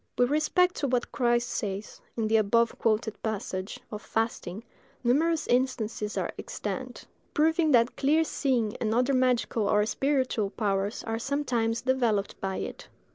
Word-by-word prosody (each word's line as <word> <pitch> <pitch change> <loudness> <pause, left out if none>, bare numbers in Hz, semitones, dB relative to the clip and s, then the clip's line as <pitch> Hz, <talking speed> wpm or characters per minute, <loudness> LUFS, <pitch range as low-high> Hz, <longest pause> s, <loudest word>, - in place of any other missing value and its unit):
With 245 +2 +3
respect 355 +4 +3
to 285 - 0
what 250 -2 0
Christ 240 -1 +1
says, 210 -4 -4 0.2
in 225 -2 0
the 220 +1 +4
above 230 +2 +2
quoted 220 -1 0
passage, 195 -3 -4
of 210 -1 -5
fasting, 225 -3 -2 0.4
numerous 310 +7 +2
instances 235 -4 0
are - - -1
extant, - - -5 0.3
proving 320 +1 +3
that 235 0 +4
clear 305 +4 +3
seeing 250 -9 0
and 220 0 -1
other 250 +3 +2
magical 250 -4 +1
or 210 0 +3
spiritual 260 -4 0
powers 200 -1 -1
are 225 0 -2
sometimes 235 -4 0
developed 240 -6 0
by 190 0 -2
it. - - -6
235 Hz, 145 wpm, -28 LUFS, 215-260 Hz, 0.4 s, the